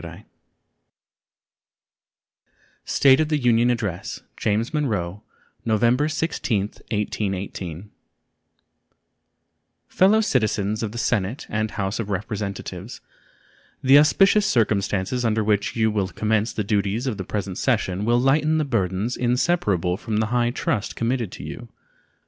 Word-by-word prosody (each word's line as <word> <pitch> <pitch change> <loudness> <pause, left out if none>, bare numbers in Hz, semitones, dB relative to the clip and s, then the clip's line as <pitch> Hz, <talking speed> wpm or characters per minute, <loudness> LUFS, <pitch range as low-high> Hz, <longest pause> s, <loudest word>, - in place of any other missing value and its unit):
State 135 0 +4
of 155 -1 +1
the 155 - +2
Union 120 -2 +3
Address 100 -7 -3
James 110 +6 -1
Monroe 105 - -2 0.4
November 120 +7 +2
16, 155 -10 -1 0.3
1818 100 -3 -3 2.0
Fellow 200 +4 +4
Citizens 110 - 0
of 110 -3 -3
the 120 - -8
Senate 115 +1 -1
and 110 +1 -1
House 100 0 -3
of 110 -3 -3
Representatives: 100 0 -5 0.8
The 135 +2 +7
auspicious 195 +7 +4
circumstances 105 - 0
under 110 -1 +1
which 105 -1 0
you 110 -1 +2
will 100 -3 0
commence 110 +4 0
the 105 - -2
duties 100 +3 0
of 125 -6 -2
the 95 - -4
present 100 -1 -4
session 105 -6 0
will 120 +2 +3
lighten 150 +4 +2
the 155 - +1
burdens 105 -2 -1
inseparable 120 - +1
from 110 0 -3
the 110 0 +1
high 120 -1 +2
trust 115 -3 -2
committed 115 -3 -1
to - - -9
you. - - -8
110 Hz, 120 wpm, -23 LUFS, 100-125 Hz, 2.0 s, The